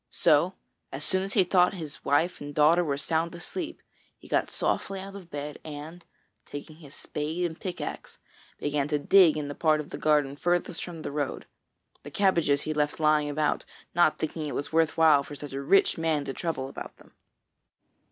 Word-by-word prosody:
So 170 +6 +3 0.4
as 135 +2 -4
soon 185 +4 +4
as 195 +1 -1
he 195 - +5
thought 180 +1 +3
his 155 -5 -6
wife 160 +6 +1
and 145 0 -7
daughter 160 +4 +5
were 140 -4 -1
sound 165 +3 0
asleep, 310 - -5 0.3
he - - -16
got - - +1
softly 195 -1 -1
out 195 +1 -8
of 185 -4 -10
bed 145 0 -6
and, 155 +3 -8 0.4
taking 145 +2 -9
his 145 -4 -12
spade 160 +4 -3
and 165 -2 -3
a - - -27
pickaxe, 180 -2 -6 0.4
began 145 -1 -1
to 150 0 +1
dig 165 +2 +5
in 150 -1 -3
the 145 - -5
part 155 0 +2
of 150 - -7
the - - -6
garden 150 -3 +2
furthest 175 +2 0
from 165 -3 -8
the - - -4
road. 145 -1 -3 0.6
The 145 - -9
cabbages 170 -5 +2
he 155 - -2
left 150 0 -1
lying 150 -1 +3
about, 150 +1 0 0.3
not 175 -2 +3
thinking 155 0 -3
it 145 - -4
was 145 - -4
worth 160 0 +2
while 155 -3 +6
for 145 +1 -9
such 145 -1 -8
a 135 - -3
rich 180 +4 +3
man 160 -3 0
to 135 - -4
trouble 160 -5 -3
about 135 - -9
them. - - -20
155 Hz, 200 wpm, -27 LUFS, 145-175 Hz, 0.6 s, while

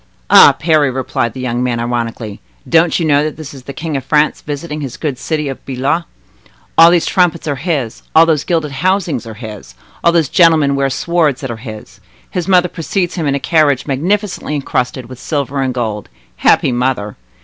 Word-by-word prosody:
"Ah! - - +8
Parry," 155 -3 +2
replied 130 -2 -2
the 130 - -8
young 125 -1 -2
man 125 -2 -1
ironically, 115 -3 -4 0.3
"don't 165 +1 +3
you 165 - 0
know 145 -1 +3
that 155 -1 -4
this 155 -3 -8
is 130 -2 -12
the - - -6
King 160 +1 -5
of 135 - -2
France 150 +3 +1
visiting 150 +1 -5
his 135 -4 -6
good 145 -6 -3
city 155 -2 -2
of 135 - -6
Blois? 135 +6 -1 0.7
All 165 +1 +8
these 175 -1 +3
trumpets 175 -4 +1
are 145 -2 -1
his, 135 -7 -3
all 160 +1 +8
those 155 -3 +1
gilded 160 -4 -1
housings 170 - -1
are 110 - -8
his, 105 - -10 0.3
all 170 - +5
those 165 -4 +2
gentlemen 155 -3 +4
wear 135 0 +1
swords 155 -1 0
that 135 -3 -4
are 115 - -6
his. 110 -5 -10 0.3
His 180 -3 -3
mother 180 -2 +4
precedes 175 +2 -2
him 160 -4 -2
in 140 - +1
a - - -1
carriage 150 -4 +2
magnificently 175 +4 -1
encrusted 125 -2 -2
with 125 +1 -11
silver 140 -2 -2
and 130 -1 0
gold. 110 -5 -4 0.3
Happy - - +3
mother! 120 -4 -1
140 Hz, 195 wpm, -15 LUFS, 125-165 Hz, 0.7 s, Ah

